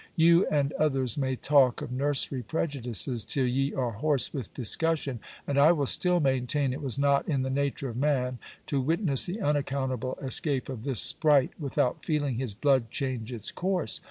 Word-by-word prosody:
You 170 +1 +5
and 145 -1 0
others 135 -6 +1
may 130 -2 -1
talk 135 -2 +3
of - - -7
nursery 135 0 +1
prejudices 125 -3 -3
till 135 -2 0
ye 135 +3 0
are 125 -4 -1
hoarse 140 +5 0
with 130 -8 -5
discussion, 140 +1 -1 0.3
and 140 0 0
I 150 +4 +7
will 145 -4 0
still 180 +6 +1
maintain 135 -1 0
it 140 - -6
was 135 -3 -3
not 140 0 +2
in 135 -4 +1
the 130 - -2
nature 140 0 -1
of 120 - -7
man 130 -3 0 0.3
to 140 -2 -1
witness 160 0 +1
the 185 +5 -4
unaccountable 135 - -1
escape 135 0 -1
of 120 -4 -6
this 135 -7 +2
spright 145 -4 +3
without 135 -4 -1
feeling 145 -6 -1
his 125 -6 -3
blood 130 -1 +2
change 130 -4 -3
its 115 -3 -5
course. 180 - -2
135 Hz, 180 wpm, -28 LUFS, 130-145 Hz, 0.3 s, I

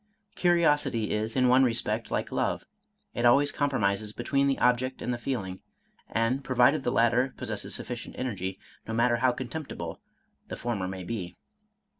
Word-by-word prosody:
Curiosity 150 - +2
is 110 +1 -1
in 130 -1 +4
one 130 +2 +6
respect 115 -2 0
like - - -2
love, - - -1 0.5
it 120 - -2
always 140 +4 +5
compromises 110 -7 0
between 140 +4 +1
the 135 - +1
object 125 +1 +1
and 125 - -2
the - - -2
feeling; 100 -8 -3 0.5
and 115 +4 0
pro 130 - -3
vided 135 +5 +5
the 125 - -1
latter 120 +2 +2
possesses 110 -5 -2
sufficient 120 -1 -5
energy, 95 -7 -3 0.3
no 115 - -3
matter 120 +1 +3
how 125 +1 +3
contemptible 120 - -6 0.5
the - - -5
former 110 -6 -2
may 95 0 -5
be. 90 -3 -5
120 Hz, 160 wpm, -28 LUFS, 110-130 Hz, 0.5 s, one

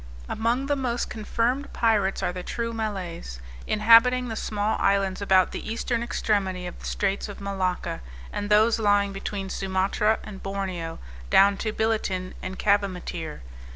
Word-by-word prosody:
Among 235 +4 0
the 285 +1 +1
most 245 -3 -2
confirmed 230 +5 -1
pirates 210 -4 +2
are 180 - 0
the 180 - -5
true 230 +5 -3
Malays, 185 - -4 0.3
inhabiting 235 +3 +5
the 225 - -3
small 210 0 -1
islands 195 -1 +1
about 190 -2 +4
the - - -5
eastern 235 +1 -1
extremity 195 -6 -1
of 175 - -7
the - - -10
straits 195 +1 -1
of 205 - -8
Malacca, 190 - -2 0.3
and 205 0 -3
those 220 +2 +4
lying 205 -2 +3
between 195 0 -4
Sumatra 195 +3 +1
and 195 -2 -9
Borneo, 190 -4 -4 0.3
down 200 +1 +6
to 215 - -2
Billitin 215 -5 -1
and 190 0 -5
Cavimattir. 180 - -1
205 Hz, 150 wpm, -26 LUFS, 190-225 Hz, 0.3 s, down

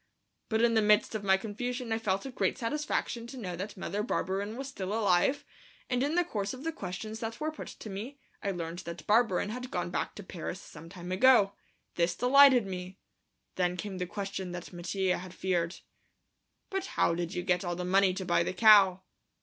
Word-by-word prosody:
But 220 +1 +2
in 235 -1 +4
the 220 - +4
midst 210 +1 +4
of 215 -2 -3
my 190 -1 +4
confusion 240 +4 -4
I 225 - +1
felt 195 -1 -1
a 270 - -5
great - - 0
satisfaction 240 -2 -2
to 265 +2 -9
know 185 -7 -4
that 195 +3 -6
Mother 200 +2 -2
Barberin 205 0 -2
was 270 0 -5
still 195 -8 -5
alive, 220 +6 +2 0.5
and 250 0 +1
in 290 +4 0
the 355 - +4
course 205 - -3
of 255 - -10
the 325 - -1
questions 215 - -6
that 225 0 -5
were 310 +1 -1
put 310 - -8
to - - -9
me 215 +8 -6 0.2
I 200 - -1
learned 170 -2 -4
that 170 0 -8
Barberin 210 -3 +3
had 250 +3 -5
gone 175 -4 -3
back - - -2
to 205 - -8
Paris 180 0 -6
some 165 -3 -12
time 180 -1 -8
ago. 205 0 +5 0.4
This 170 0 +2
delighted 260 -1 +6
me. 185 0 -6 0.6
Then 180 -1 +1
came 190 0 -5
the 180 - -2
question 195 -1 -4
that 180 +1 -7
Mattia 180 +1 -1
had 180 0 -10
feared. 175 -2 -1 0.9
"But 385 0 -2
how - - +4
did 170 +1 -3
you 180 - -2
get 180 0 +1
all 175 -1 -2
the 180 +1 -4
money 190 0 +3
to 190 - -4
buy 170 -1 +3
the 170 - -1
cow?" 195 -2 +6
200 Hz, 205 wpm, -30 LUFS, 180-235 Hz, 0.9 s, delighted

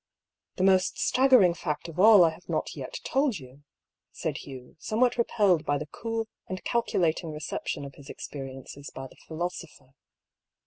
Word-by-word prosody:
"The 185 - -1
most 190 -1 +3
staggering 255 -9 +5
fact 170 -2 -4
of 165 +1 -8
all 210 -2 +8
I 165 - +4
have 170 +3 -15
not - - -2
yet - - -6
told 270 -5 +1
you," 130 0 -14 0.5
said - - -3
Hugh, 130 -2 -10
somewhat 240 +3 +1
repelled 205 -8 +2
by 145 - +1
the 150 - -5
cool 225 +7 -4 0.2
and 185 0 -5
calculating 170 -8 0
reception 150 -1 -4
of 140 - -9
his 140 +1 -14
experiences 135 0 -8
by 135 - -8
the 130 - -14
philosopher. 160 -5 -6
170 Hz, 160 wpm, -28 LUFS, 145-210 Hz, 0.5 s, all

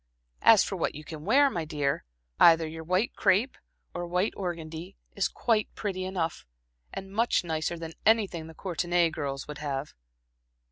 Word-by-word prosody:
As - - +7
for - - -4
what - - -1
you 150 - -8
can 155 0 -9
wear, 275 +7 +5
my 170 - -2
dear 145 -3 -1 0.3
either 165 -1 +7
your 160 +1 -7
white 185 +7 0
crepe 225 +8 +2 0.4
or 175 - -4
white 180 +4 0
organdie 170 -1 -5 0.2
is 200 - +2
quite 220 -3 0
pretty 185 -3 -3
enough, 175 -4 -2 0.5
and 195 0 -7
much 230 -1 +2
nicer 160 0 -2
than 165 0 -7
anything 200 -7 +2
the 160 - -12
Courtenay 175 -1 +1
girls 140 -2 -4
would 150 0 -7
have." 145 -1 -4
170 Hz, 160 wpm, -28 LUFS, 160-195 Hz, 0.5 s, As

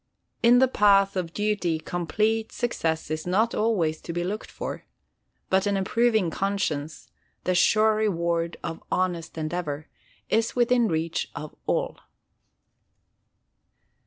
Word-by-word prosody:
In 240 +1 +6
the 260 +1 +5
path 200 -4 +4
of 180 -3 -2
duty 205 -5 0
complete 215 +7 -1
success 160 -10 -2
is 155 +2 -3
not 215 +6 +2
always 180 -8 0
to - - -6
be 175 +1 -2
looked 205 +4 -4
for; - - -6 0.7
but 190 +1 +3
an 200 -1 +1
approving 220 -1 +2
conscience, 160 -6 -2 0.3
the 185 - +1
sure 215 +5 +4
reward 170 -5 0
of 165 - -5
honest 175 -3 -1
endeavour, 155 -2 -3 0.4
is 225 +1 +1
within 240 -1 +3
reach 165 -1 -1
of 150 +1 -7
all. - - -1
185 Hz, 125 wpm, -26 LUFS, 165-215 Hz, 0.7 s, In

